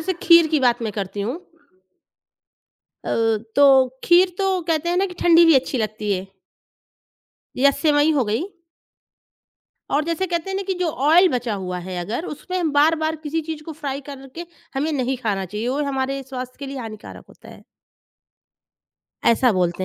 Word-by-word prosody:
जैसे 375 +4 -1
खीर 335 -1 +7
की 290 - +3
बात 240 -2 +2
मैं 215 -2 -3
करती 200 0 -5
हूँ। 245 - -3 1.7
अ, - - -1 0.4
तो 285 - +6 0.4
खीर 355 +1 +4
तो 385 -2 +1
कहते 325 +1 0
हैं 350 - 0
ना 390 +1 +2
कि 360 - -9
ठंडी 340 0 +6
भी 330 -3 +6
अच्छी 260 -1 +1
लगती 215 -1 -2
है। 190 0 -3 1.3
या 280 +2 +5
सेवई 295 +1 +2
हो 270 -5 +1
गई। 220 +8 -1 1.5
और 295 +2 +1
जैसे 335 +3 -1
कहते 340 +1 -3
हैं 385 - -2
ना 395 - -2
कि 380 - -1
जो 355 - +1 0.2
ऑइल 355 +4 +6
बचा 240 -3 -2
हुआ 180 -2 -4
है 185 -1 -5
अगर 225 - -4
उसमें 350 +1 -3
बार-बार 315 +2 +2
किसी 320 +1 -2
चीज़ 310 -1 -5
को 320 - -7
फ्राइ 280 -2 -3
करके 275 +5 -9 0.3
हमें 295 +4 -1
नहीं 260 -1 -1
खाना 200 -3 -1
चाहिए। 210 +6 -4
वो 285 +3 -1
हमारे 270 0 -2
स्वास्थ्य 255 -1 -7
के 280 - -7
लिए 275 0 -6
हानिकारक 220 -3 -9
होता - - -17
है। - - -14 1.6
ऐसा 235 0 +3
बोलते 180 0 -1
280 Hz, 170 wpm, -21 LUFS, 230-330 Hz, 1.7 s, खीर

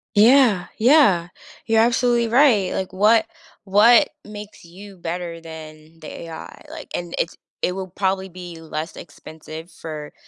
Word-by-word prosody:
Yeah. 225 -3 +5
Yeah. 220 - +4 0.4
You're 225 0 +3
absolutely 240 0 +2
right. 235 -7 +4
Like, 190 0 -4
what 215 +3 +4 0.4
what 210 +5 +5
makes 210 0 -11
you 190 +3 -13
better 170 0 -5
than 160 0 -12
the 155 - -9
AI? 165 -1 -10
Like, 315 -2 -10
and 175 -1 -5
it's 165 - -2 0.3
it 180 - 0
will 190 -1 -5
probably 190 +1 -2
be 175 -2 -10
less 160 +1 -6
expensive 160 +1 -11
for 155 -2 -8
185 Hz, 140 wpm, -21 LUFS, 165-220 Hz, 0.4 s, Yeah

